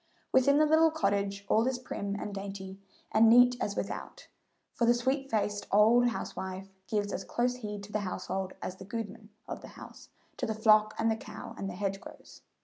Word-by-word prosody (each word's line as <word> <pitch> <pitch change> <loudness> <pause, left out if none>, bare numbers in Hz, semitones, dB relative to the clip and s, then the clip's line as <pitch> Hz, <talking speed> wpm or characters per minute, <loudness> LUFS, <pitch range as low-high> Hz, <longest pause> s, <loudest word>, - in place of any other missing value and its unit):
Within 280 +2 +5
the 310 - +5
little 320 +1 +5
cottage 200 -7 -1
all 225 +3 +3
is 260 -1 0
as 250 - -15
prim 200 -5 -4
and 205 0 -5
dainty 195 -1 -7 0.3
and 220 +1 +6
neat 245 +1 +7
as 200 - -1
without, - - -6 0.4
for 235 - +1
the 240 - +5
sweet 265 +3 -1
faced 210 -2 -1
old 225 +4 +5
housewife 190 -4 -5 0.2
gives 205 -2 -1
as - - -3
close 245 +1 -1
heed 210 -4 -6
to 205 - -11
the 210 - 0
household 190 0 -4
as 185 - -5
the 190 - -10
"gudeman" 215 0 -6 0.2
of - - -6
the - - -10
house - - -12 0.3
to - - -2
the 220 - -2
flock 215 -1 +4
and 225 0 +2
the - - +1
cow 215 -1 -9
and 195 - -4
the 180 - -6
hedgerows. 195 0 -6
215 Hz, 200 wpm, -30 LUFS, 200-240 Hz, 0.4 s, neat